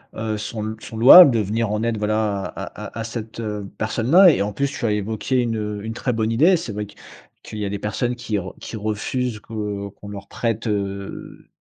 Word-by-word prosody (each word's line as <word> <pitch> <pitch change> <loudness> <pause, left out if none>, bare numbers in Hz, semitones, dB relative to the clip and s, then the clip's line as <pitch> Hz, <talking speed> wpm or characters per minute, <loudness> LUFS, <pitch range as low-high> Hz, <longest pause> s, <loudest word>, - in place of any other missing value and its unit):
heu, 110 -1 -2
sont 110 0 -5
l - - -10
sont 110 - -8
louables, 140 +6 +10
de 115 - +1
venir 110 +2 -1
en 105 +1 -1
aide, 115 -2 0
voilà, 105 -2 0
à - - -6 0.2
à - - -9
à - - -2
cette, 110 0 -7
heu, 105 -3 -4
personne-là 140 - +5
et, 135 - 0
en 105 0 -1
plus, 140 +4 0
tu 120 - -4
as 105 - +2
évoqué 110 +5 -1
une, 115 -2 -1
heu 105 -1 -4
une 115 - -4
très 125 +1 -2
bonne 110 0 0
idée. 165 +10 +4
C'est 120 -10 -6
vrai 105 0 -4
que 105 - -16 0.5
qu'il 110 - -8
y - - -2
a - - -2
des 100 -1 -4
personnes 120 +4 -2
qui 115 -4 -3
re 95 -1 -5
qui - - -8
refusent 110 +3 -2
que 105 -2 -5
qu'on 100 +1 -12
leur 100 -1 -8
prête, 115 -1 -2
heu, 100 -1 -5
110 Hz, 230 wpm, -22 LUFS, 105-115 Hz, 0.5 s, louables